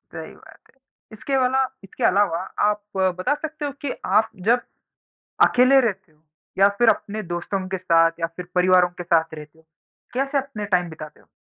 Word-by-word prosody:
सही - - -8
बात - - -17 0.3
है। 215 - -18
इसके 270 +3 -1
वाला 260 +1 +2 0.2
इसके 195 - -8
अलावा 190 -3 +3 0.3
आप 210 0 -2 0.2
बता 185 +6 +1
सकते 305 0 -6
हो 285 - -3
कि 285 - -3 0.3
आप 220 - -2 0.2
जब 245 +1 +4 0.9
अकेले 255 +2 +5
रहते 190 -5 -8
हो 150 - -33 0.4
या 200 +1 +6
फिर 240 - +4
अपने 215 +1 -7
दोस्तों 185 +2 -3
के 190 - -2
साथ 165 -2 +2
या 165 - +1
फिर 180 0 -7
परिवारों 180 0 +4
के 175 0 -9
साथ 165 -1 +1
रहते 150 +1 -12
हो? 160 - -24 0.5
कैसे 275 +2 0
अपने 265 -6 -5
टाइम 180 -1 +1
बिताते 155 -1 -11
हो? - - -26
190 Hz, 185 wpm, -22 LUFS, 175-250 Hz, 0.9 s, या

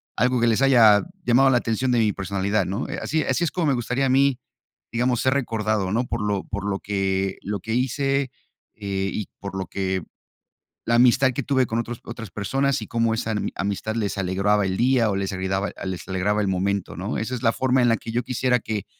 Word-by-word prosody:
algo 125 +1 +2
que 120 - +4
les 115 +4 +2
haya 115 -5 +6 0.2
llamado 135 +3 +4
la 125 - +4
atención 120 +2 0
de 120 - +3
mi 105 -2 +2
personalidad, 100 +1 -1
¿no? 100 +7 -3
Eh, - - -4
así 160 0 -1
así 175 - 0
es 165 - 0
como 170 -4 -1
me 140 - +3
gustaría 125 +3 0
a - - 0
mí, 135 -1 +3 0.5
digamos, 120 +1 +1
ser 130 0 +2
recordado, 110 -6 -1
¿no?, 120 +4 +1
por - - -3
lo 100 -2 -1
por 100 -1 -5
lo 100 -1 -1
que 95 -1 -1
lo 100 0 -3
que 110 +4 -4
hice, 135 +1 0 0.4
eh, 95 -2 -2
y 105 - -3
por 100 -1 -7
lo 95 -2 -3
que 95 -1 -2 0.8
la 115 - +2
amistad 125 +2 +5
que - - -2
tuve 130 -3 +2
con 115 +1 -1
otros 120 0 -4
otras 115 -4 -8
personas, 135 +7 0
y - - -6
cómo 115 -1 +1
esa 115 0 -2
ami 105 - -2
amistad 100 +2 -2
les 105 -3 -2
alegraba 100 +2 +1
el 95 0 -1
día, 120 -3 +3
o 100 - 0
les 95 0 -2
ayudaba, 95 +1 -1
les 95 -2 -4
alegraba 100 +3 0
el 100 - 0
momento, 95 +1 -1
¿no? - - -3
Esa 115 +4 -3
es 115 - -6
la 115 - +3
forma 130 -1 +2
en 120 - +4
la 115 - +4
que 115 - -7
yo 120 +1 -1
quisiera 125 0 +1
que 110 -3 -4
110 Hz, 225 wpm, -23 LUFS, 100-125 Hz, 0.8 s, haya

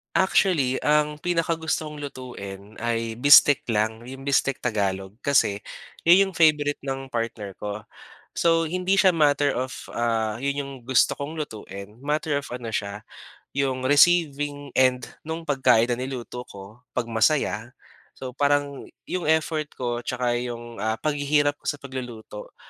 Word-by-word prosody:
Actually 170 -8 +3
ang 150 0 +2
pinakagusto 165 -2 -1
kong 150 -1 -8
lutuin 105 -7 -8
ay 115 -1 -1
bistek 145 +2 +7
lang, 110 +2 0
'yong 135 +2 -9
bistek 135 -1 +1
Tagalog 100 -3 -2
kasi 105 -8 +2 0.4
'yon 175 +3 +7
'yong 190 - -8
favorite 150 -3 +3
ng 135 -1 -4
partner 115 -5 -4
ko. 105 0 -5 0.6
So, 165 -1 +3
hindi 180 +3 0
siya 190 -2 +6
matter 145 -2 +3
of, 130 +1 -2 0.2
ah, 115 -2 0
'yon 140 +1 0
'yong 140 -1 -5
gusto 125 0 +3
kong 155 +3 -6
lutuin 105 -7 -7
matter 150 +1 0
of - - -9
ano 120 -1 -5
siya, 100 0 -3 0.5
'yong 135 -2 -1
receiving 145 -1 +3
and 130 -1 +3 0.2
nung 160 +1 -4
pagkain 125 -5 +3
na 120 - -1
niluto 125 -1 -6
ko 100 +3 -12 0.2
'pag 125 -2 -1
masaya. 115 -1 +1 0.4
So, 130 -1 -7
parang 145 +1 0 0.2
'yong 180 -3 -3
effort 155 -1 +1
ko 120 -1 -2
tsaka 125 -1 -1
'yong, 120 -2 -6
ah, 110 +2 0
paghihirap 145 -1 +1
ko - - -11
sa - - +1
pagluluto 125 -6 -8
130 Hz, 145 wpm, -24 LUFS, 115-150 Hz, 0.6 s, bistek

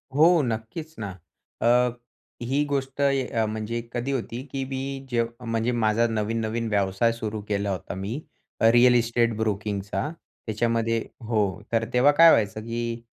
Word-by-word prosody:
हो, 155 +2 +6 0.2
नक्कीच 120 +8 -4
ना. 100 -2 -4 0.5
अ, 115 - +2 0.8
ही 140 +3 +2
गोष्ट 135 -1 -2
य 130 -5 +1
म्हणजे 110 +2 -3
कधी 125 +3 -2
होती 120 -1 -3
की 135 -1 -2
मी 135 0 -5
जे 120 -1 +2 0.2
म्हणजे 115 +1 0
माझा 115 0 +2
नवीन-नवीन 115 +1 -1
व्यवसाय 100 +2 +2
सुरू 110 -2 -4
केला 100 -1 -1
होता 95 - -4
मी, 100 +4 -4 0.5
रिअल 120 +2 +6
इस्टेट 115 -1 +2
ब्रोकिंगचा, 100 +1 -2 0.4
त्याच्यामध्ये 115 +1 0 0.3
हो. 105 -3 0
तर 115 -1 +1
तेव्हा 130 +4 +5
काय 165 0 +9
व्हायचं, 110 0 +2
की 115 +1 -4
115 Hz, 140 wpm, -25 LUFS, 110-125 Hz, 0.8 s, काय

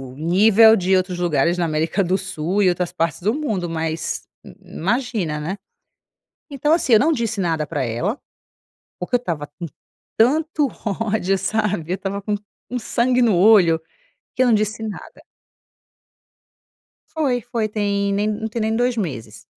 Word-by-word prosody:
nível 205 +8 +5
de 190 -1 +2
outros 185 -1 0
lugares 170 0 +1
na 175 - +1
América 160 +5 0
do 185 +1 +1
Sul 190 0 -2
e 185 - +5
outras 180 0 -1
partes 165 -2 -1
do 210 +5 +1
mundo. 220 - -2
Mas 160 0 -3 0.2
i - - -11
i - - -17
imagina, 210 - -1
né? 170 +7 -4 0.9
Então, 290 +2 0
assim, 325 -6 +2
eu - - +7
não 315 +5 +3
disse 235 -6 -2
nada 165 -4 -1
para 145 -4 -2
ela, 145 - -2 0.8
porque - - -5
eu - - 0
estava 165 -11 -4
com 160 +4 -8 0.5
tanto 300 +5 +2 0.2
ódio, 205 -2 0
sabe? 195 -4 -1
Eu - - +2
estava 200 +1 -4
com 210 - -3
um - - 0 0.4
um 250 - -1
sangue 245 +2 +1
no 225 -6 +3
olho, 180 -4 +5 0.6
que 255 - +3
eu - - +3
não 240 - +4
disse 215 +1 0
nada. 215 -2 -8 1.9
Foi, 275 -6 0
foi, 235 -2 -2
tem 200 -1 -1
nem 205 +1 0
não 215 +1 -2
tem 225 +1 -4
nem 220 +1 0
2 245 +1 +1
meses. 115 - -5
200 Hz, 170 wpm, -21 LUFS, 175-230 Hz, 1.9 s, eu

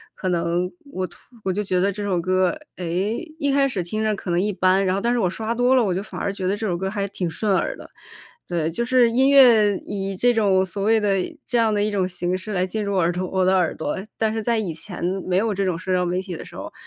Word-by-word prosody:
可 185 - -3
能 175 +1 0 0.2
我 185 0 -2
突 175 - -13 0.3
我 190 - 0
就 205 +3 -1
觉 185 -2 0
得 200 +1 +2
这 205 - -6
首 195 -4 0
歌， 185 - +1 0.2
哎， 180 - -5 0.5
一 285 -1 +1
开 275 0 +3
始 195 -9 -2
听 215 +6 -3
着 215 -1 +1
可 185 -2 -5
能 175 - +2
一 205 +2 0
般， 190 +1 +3
然 185 0 +1
后 195 - -1
但 235 +2 +1
是 245 - +1
我 185 - +2
刷 220 +4 -3
多 245 +2 +3
了， 250 - +4
我 190 -4 0
就 190 - -2
反 205 - -8
而 200 - -1
觉 190 -2 -3
得 200 - +1
这 220 - -4
首 180 -4 -1
歌 190 +2 -2
还 200 0 -2
挺 180 -4 -3
顺 200 +4 -1
耳 - - 0
的。 - - -12 0.6
对， 165 -2 -1
就 235 +8 -2
是 240 -1 +4
音 265 +3 +3
乐 230 -7 +6
以 195 -1 -3
这 245 +5 +3
种 195 -4 +3
所 195 +2 -6
谓 220 +1 +4
的 205 -1 0 0.4
这 245 - -4
样 225 -1 +3
的 205 -1 +1
一 210 - 0
种 190 -2 0
形 180 0 -2
式 200 +3 -6
来 185 -2 +1
进 210 +3 -3
入 200 -1 -2
耳 175 -1 +2
朵 180 +1 -3
我 190 -1 +1
的 190 +1 +4
耳 180 -3 +1
朵。 150 - -3 0.2
但 220 -1 +1
是 225 - -2
在 235 +1 +1
以 190 -7 -2
前 170 +2 -8 0.2
没 185 0 +1
有 215 +1 +1
这 195 - -1
种 185 -3 0
社 185 +2 -3
交 180 0 +2
媒 180 +1 -1
体 185 -2 -5
的 - - -7
时 - - -13
候， - - -7
195 Hz, 305 characters per minute, -22 LUFS, 180-220 Hz, 0.6 s, 乐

